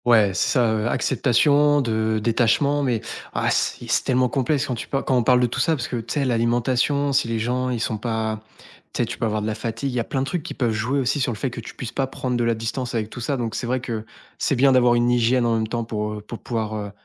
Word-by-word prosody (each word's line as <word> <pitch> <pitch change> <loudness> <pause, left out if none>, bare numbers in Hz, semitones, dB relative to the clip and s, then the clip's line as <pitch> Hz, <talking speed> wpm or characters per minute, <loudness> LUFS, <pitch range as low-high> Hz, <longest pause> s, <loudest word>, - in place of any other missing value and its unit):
Ouais, 110 -5 +5
c'est 100 - +1
ça, 120 -3 +3
heu, 110 +1 0
acceptation 145 +5 +3
de 110 -3 0
détachement, 120 +6 +2
mais 120 -5 0 0.3
ah, - - 0
si, - - -1
c'est - - +1
tellement 125 0 +2
complexe 135 +2 0
quand 130 - -2
tu 115 - -5
pa 135 - -1
quand 130 - +1
on 125 - +4
parle 125 +2 +4
de 125 - +3
tout 120 - -3
ça 165 - +2
parce 125 -5 -4
que 125 - -3
tu 115 +4 -5
sais, 140 -2 +1
l'alimentation, 125 +4 +1
si 135 -3 +2
les 115 0 -1
gens 125 +3 -1
ils 125 -2 -2
sont 110 -1 -2
pas 110 -1 -2 0.5
tu - - 0
sais, - - 0
tu - - -7
peux - - 0
avoir 105 -1 -1
de - - -2
la 110 - -1
fatigue, 120 +5 -3
il - - -8
y 125 - 0
a - - +1
plein 135 +2 -2
de - - 0
trucs 175 +4 -2
qui 175 - -7
peuvent 120 -4 0
jouer 115 +6 -1
aussi 135 +3 0
sur 125 -2 0
le 110 - -5
fait 130 +4 -2
que 115 - -6
tu - - -10
puisses 120 - -6
pas 135 -1 -1
prendre 130 -1 -3
de 120 - +1
la 115 0 +2
distance 115 +3 -4
avec 110 -1 -2
tout 120 - -7
ça. 140 +4 -1
Donc 115 -3 -3
c'est 120 +1 -3
vrai 130 +1 0
que 115 -3 -4 0.4
c'est - - +1
bien 135 +2 +5
d'avoir 125 -2 +5
une 120 0 +2
hygiène 120 +1 +3
en 115 - +2
même 110 -1 0
temps 115 +1 -2
pour, 105 -1 -3
heu, 105 - -6
pour 110 +2 -8
pouvoir, 110 -3 -3
heu, 105 -1 -5
120 Hz, 290 wpm, -23 LUFS, 110-130 Hz, 0.5 s, Ouais